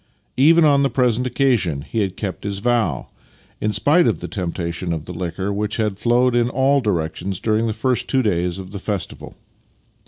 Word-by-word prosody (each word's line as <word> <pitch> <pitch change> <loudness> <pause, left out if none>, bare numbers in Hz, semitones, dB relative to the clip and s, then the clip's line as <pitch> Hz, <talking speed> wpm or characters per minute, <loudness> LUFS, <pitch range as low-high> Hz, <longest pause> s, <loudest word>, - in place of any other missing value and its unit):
Even 160 +5 +6
on 140 -2 +4
the 140 - +2
present 125 -1 +1
occasion 120 - +1
he 115 - -3
had 95 -3 -2
kept 100 -4 -5
his 100 -1 -3
vow, 110 - 0 0.5
in 105 - 0
spite 150 - +3
of - - 0
the - - -6
temptation 85 -2 -3
of 80 -2 -5
the 90 - -7
liquor 95 +3 -3
which 105 +1 -2
had 105 -3 -1
flowed 120 +2 +2
in 120 0 +2
all 135 +2 +2
directions 90 -2 -2
during 110 +2 +1
the - - 0
first 120 +2 -1
two 130 -1 +1
days 90 -4 0
of 95 -1 -9
the 100 - -6
festival. 100 -1 -5
105 Hz, 190 wpm, -20 LUFS, 90-125 Hz, 0.5 s, Even